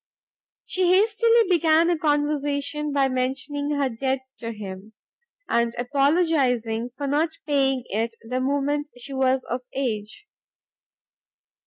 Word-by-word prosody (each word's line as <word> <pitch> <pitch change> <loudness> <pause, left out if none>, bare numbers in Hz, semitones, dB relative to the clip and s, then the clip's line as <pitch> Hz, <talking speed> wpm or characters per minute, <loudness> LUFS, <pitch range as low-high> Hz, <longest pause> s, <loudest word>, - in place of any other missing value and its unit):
She 365 -1 +1
hastily 450 +3 +4
began 335 -1 +4
a - - +2
conversation 295 -1 0
by 280 -1 +2
mentioning 270 +3 -2
her 280 -1 +1
debt 260 +2 -2 0.2
to 230 -1 -4
him, 205 -1 -8 0.5
and 235 0 +1
apologising 255 -4 +1
for 285 - -3
not 295 +4 +1 0.2
paying 270 -3 +1
it 225 +3 -2
the 255 +2 -1
moment 285 +2 0
she 275 +3 -9
was 265 -1 +1
of 245 +2 -3
age. 220 - -3
275 Hz, 120 wpm, -24 LUFS, 245-300 Hz, 0.5 s, hastily